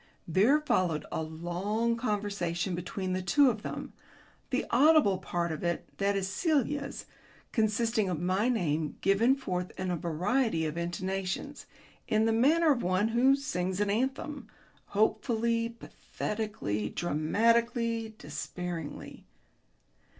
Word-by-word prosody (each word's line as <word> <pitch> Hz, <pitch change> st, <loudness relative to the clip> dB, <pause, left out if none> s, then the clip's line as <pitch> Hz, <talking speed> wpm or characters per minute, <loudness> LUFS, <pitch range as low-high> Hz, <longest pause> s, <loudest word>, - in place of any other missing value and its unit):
There 210 Hz, -, +4 dB
followed 185 Hz, -, 0 dB
a -, -, -2 dB
long 175 Hz, +9 st, -1 dB
conversation 200 Hz, -6 st, -2 dB
between 185 Hz, +2 st, -3 dB
the 185 Hz, -, -1 dB
two 260 Hz, +9 st, +4 dB
of 220 Hz, -2 st, -7 dB
them, -, -, -6 dB, 0.6 s
the -, -, 0 dB
audible 275 Hz, -7 st, +5 dB
part 170 Hz, -1 st, -2 dB
of 155 Hz, -, -5 dB
it 170 Hz, 0 st, -1 dB
(that 200 Hz, 0 st, +2 dB
is 195 Hz, -1 st, -1 dB
Celia's) 280 Hz, -, -1 dB, 0.5 s
consisting 220 Hz, -2 st, +1 dB
of 175 Hz, -4 st, -2 dB
my 185 Hz, +7 st, +1 dB
name 160 Hz, -, -1 dB
given 220 Hz, +7 st, +4 dB
forth 180 Hz, -9 st, -3 dB
in 185 Hz, -1 st, -1 dB
a -, -, +1 dB
variety 175 Hz, -, 0 dB
of 155 Hz, 0 st, -3 dB
intonations, 190 Hz, +9 st, -3 dB, 0.4 s
in 215 Hz, 0 st, +2 dB
the 225 Hz, -, +2 dB
manner 305 Hz, +8 st, +4 dB
of 250 Hz, -4 st, +1 dB
one 185 Hz, +3 st, +1 dB
who 250 Hz, +4 st, +4 dB
sings 185 Hz, -9 st, -2 dB
an 205 Hz, -1 st, +1 dB
anthem 265 Hz, +3 st, -2 dB, 0.4 s
hopefully, 230 Hz, +2 st, +1 dB
pathetically, 210 Hz, -, -4 dB
dramatically, 230 Hz, -, +1 dB
despairingly. 175 Hz, -7 st, -6 dB
205 Hz, 125 wpm, -30 LUFS, 180-235 Hz, 0.6 s, audible